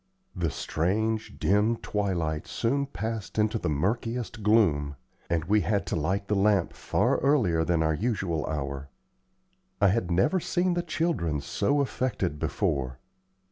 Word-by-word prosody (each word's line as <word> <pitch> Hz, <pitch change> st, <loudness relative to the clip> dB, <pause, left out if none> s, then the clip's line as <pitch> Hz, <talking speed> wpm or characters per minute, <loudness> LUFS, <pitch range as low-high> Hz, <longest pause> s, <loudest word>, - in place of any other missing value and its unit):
The 85 Hz, -3 st, 0 dB
strange, 110 Hz, +10 st, -1 dB
dim 105 Hz, +4 st, +2 dB
twilight 85 Hz, -9 st, -2 dB
soon 140 Hz, +4 st, 0 dB
passed 110 Hz, -4 st, -5 dB
into 110 Hz, +1 st, +2 dB
the -, -, -1 dB
murkiest 115 Hz, -, -2 dB
gloom, 85 Hz, -10 st, +3 dB, 0.3 s
and 80 Hz, -1 st, 0 dB
we 105 Hz, +3 st, +3 dB
had 100 Hz, +3 st, 0 dB
to -, -, -2 dB
light 95 Hz, +6 st, -1 dB
the -, -, 0 dB
lamp 100 Hz, -2 st, +2 dB
far -, -, +1 dB
earlier 110 Hz, -, +3 dB
than 80 Hz, -1 st, +1 dB
our 80 Hz, 0 st, +2 dB
usual 95 Hz, -5 st, -1 dB
hour. 70 Hz, -2 st, -4 dB, 0.9 s
I 100 Hz, -2 st, +5 dB
had 100 Hz, -2 st, 0 dB
never 95 Hz, -, +2 dB
seen 180 Hz, +1 st, 0 dB
the 175 Hz, -, 0 dB
children 155 Hz, -, -1 dB
so 140 Hz, -, 0 dB
affected 105 Hz, -, -1 dB
before. 65 Hz, -3 st, -1 dB
100 Hz, 140 wpm, -27 LUFS, 80-115 Hz, 0.9 s, I